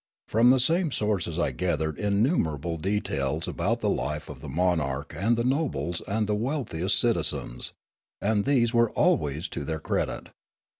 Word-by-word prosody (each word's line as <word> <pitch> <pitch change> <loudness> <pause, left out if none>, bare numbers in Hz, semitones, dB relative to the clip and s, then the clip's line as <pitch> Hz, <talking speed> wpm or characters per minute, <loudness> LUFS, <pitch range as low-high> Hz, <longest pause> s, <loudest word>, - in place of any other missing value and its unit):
From 115 +3 +4
the 130 +1 +5
same 165 +5 +2
sources 100 -8 -1
I 85 - +1
gathered 80 -4 -1
innumerable 100 - +1
details 80 -5 -1
about - - -1
the - - +1
life 75 +3 -3
of - - -8
the - - -8
monarch 75 -5 0
and 115 +6 +1
the 115 - +1
nobles 130 - -1
and 110 +2 0
the 105 - 0
wealthiest 105 - -1
citi 120 -4 +3
zens, 65 -6 -2 0.5
and 105 -1 +1
these 120 -3 +2
were 115 -1 +4
always 75 +2 +1
to - - -4
their 80 +2 -3
credit. - - -2
100 Hz, 160 wpm, -27 LUFS, 80-115 Hz, 0.5 s, the